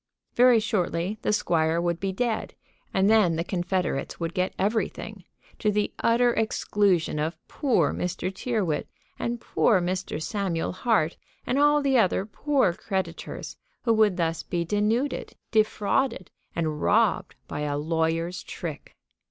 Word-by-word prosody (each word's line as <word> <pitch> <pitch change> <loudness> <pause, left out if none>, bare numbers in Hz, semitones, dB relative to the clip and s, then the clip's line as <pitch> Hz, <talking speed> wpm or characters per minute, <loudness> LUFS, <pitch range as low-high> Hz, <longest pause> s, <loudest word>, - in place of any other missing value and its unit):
Very 245 -1 +6
shortly 195 -2 -1
the - - 0
squire 165 -5 +1
would 170 -1 -1
be 195 -1 -1
dead, 225 +3 -2 0.4
and 190 +1 +2
then 210 -6 +4
the 165 - -1
confederates 175 -5 -2
would 165 0 -3
get 185 0 0
everything, 215 +3 -2 0.3
to 210 - +2
the 210 0 0
utter 240 +1 +3
exclusion 205 -7 +1
of 160 +3 -2
poor 275 -5 +1
Mr. 180 +1 -3
Tyrrwhit, 195 -9 -1 0.3
and 235 0 -2
poor 220 -2 +2
Mr. 180 -2 -2
Samuel 175 0 -2
Hart, 185 -5 +1 0.3
and 260 - +1
all 295 0 +4
the 270 -3 +4
other 190 -2 +2
poor 260 -2 +1
creditors, 190 -2 -4 0.3
who 230 - +3
would 215 -4 +3
thus 165 -2 0
be 170 -1 -2
denuded, 215 - 0 0.2
defrauded, 215 0 +1 0.2
and 155 -2 -2
robbed 220 0 +2
by - - -5
a 145 -1 -1
lawyer's 165 +3 -1
trick. 160 -4 -7
190 Hz, 140 wpm, -26 LUFS, 170-225 Hz, 0.4 s, Very